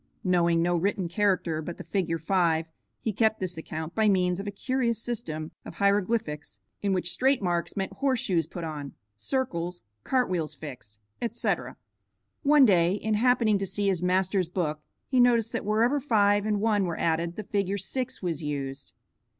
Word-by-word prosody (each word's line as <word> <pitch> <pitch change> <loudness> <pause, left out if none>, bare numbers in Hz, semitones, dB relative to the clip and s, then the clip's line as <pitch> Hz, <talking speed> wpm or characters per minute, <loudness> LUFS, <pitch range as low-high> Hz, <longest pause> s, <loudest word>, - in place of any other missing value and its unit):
Knowing 170 -2 +3
no 175 0 +2
written 185 +1 0
character 180 -4 +1
but 170 +2 -6
the - - -7
figure 175 -4 -1
5 165 -1 +1 0.3
he 220 - -2
kept 220 +1 +2
this 185 -2 -2
account 160 +1 -6
by 220 -1 +3
means 180 -2 +2
of 200 - -5
a - - 0
curious 235 +2 -1
system 165 -11 -4
of - - -9
hieroglyphics 200 - 0 0.2
in 200 - 0
which 180 -2 0
straight 265 +1 +2
marks 175 -2 -1
meant 195 0 -2
horse 260 +4 +1
shoes 170 -6 +1
put 175 - -7
on, 150 -3 -5 0.2
circles, 175 - -2 0.2
cart 255 -2 +2
wheels 170 -4 -2
fixed, 125 -8 -10 0.2
etc. 235 - -2 0.6
One 290 -2 +6
day 175 -4 +4
in 215 +1 -1
happening 225 -2 +3
to 195 - -2
see 200 +1 0
his 185 -3 0
master's 185 0 +1
book 160 -4 -1 0.3
he 255 - +1
noticed 235 -2 +4
that - - -3
wherever 230 +7 +2
five 205 -5 +3
and 210 -1 +1
one 210 -2 +2
were 170 -2 -3
added 170 +1 0
the 215 - -5
figure 200 -1 -1
6 255 +5 -4
was 165 -4 -2
used. 140 -2 -5
190 Hz, 175 wpm, -27 LUFS, 170-220 Hz, 0.6 s, One